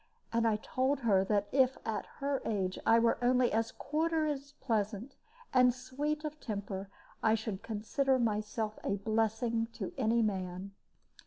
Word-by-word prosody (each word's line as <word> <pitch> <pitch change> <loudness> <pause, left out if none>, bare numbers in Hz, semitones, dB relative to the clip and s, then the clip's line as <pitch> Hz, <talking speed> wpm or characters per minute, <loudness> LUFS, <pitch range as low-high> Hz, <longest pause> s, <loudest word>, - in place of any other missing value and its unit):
And 230 0 +3
I 220 - +3
told 260 +5 0
her 200 -5 +4
that 205 0 +1
if 260 -1 +3
at 220 -1 -2
her 280 -1 -1
age 190 -4 -1
I 225 - +7
were 230 0 +3
only 250 0 +4
a 225 +1 +3
quarter 315 +2 0
as 285 -1 -3
pleasant 225 -1 -2 0.4
and 250 -1 +6
sweet 285 +5 -3
of 305 0 -5
temper, 200 -4 -4 0.3
I 220 0 +4
should 215 -3 -4
consider 230 +5 0
myself 215 -1 -1
a 200 - 0
blessing 225 +2 0
to 195 -6 -5
any 230 -1 +3
man. 190 -2 -2
230 Hz, 155 wpm, -32 LUFS, 210-260 Hz, 0.4 s, I